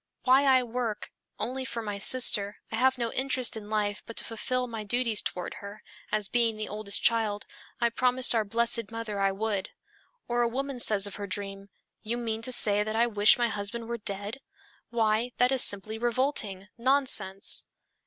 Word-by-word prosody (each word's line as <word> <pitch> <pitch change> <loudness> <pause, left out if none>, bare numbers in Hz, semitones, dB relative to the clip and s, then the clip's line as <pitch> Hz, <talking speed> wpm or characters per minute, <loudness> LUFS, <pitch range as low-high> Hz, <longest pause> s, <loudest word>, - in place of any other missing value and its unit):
Why 265 +2 +4
I 260 -2 +4
work 235 -3 -4 0.3
only 260 +2 -4
for 235 -3 -5
my 205 -2 -5
sister, 210 -3 +4
I - - -3
have 260 +3 +2
no 235 -2 -3
interest 260 -2 +2
in 210 -1 -9
life 210 -1 -2
but 230 - -9
to - - +1
fulfill 250 +3 -2
my 225 -3 -7
duties 230 0 0
toward 180 - -5
her, 200 +1 -10 0.3
as 210 -2 +1
being 230 -1 +1
the 215 - -4
oldest 210 -1 0
child, 220 -3 +1 0.3
I 235 -1 +1
promised 250 +1 +2
our 225 -2 +1
blessed 230 +1 0
mother 225 -3 -5
I 195 0 +2
would." 200 -1 -3 0.6
Or 240 0 0
a 235 - +2
woman 270 +1 -4
says 210 -4 +3
of 200 - -6
her 205 -1 -6
dream, 195 0 -5 0.3
"You 230 +2 -4
mean 225 -2 -3
to 255 - -2
say 210 -4 +7
that 215 +1 -3
I 230 +1 +3
wish 210 -2 +4
my 240 -1 +1
husband 220 +3 -4
were 235 0 -5
dead! 205 +4 -4 0.5
Why, 225 +1 0
that 250 +1 +3
is 265 -2 +2
simply 215 +2 +1
revolting, 230 -5 0
nonsense. 255 -7 +2
225 Hz, 185 wpm, -27 LUFS, 205-245 Hz, 0.6 s, say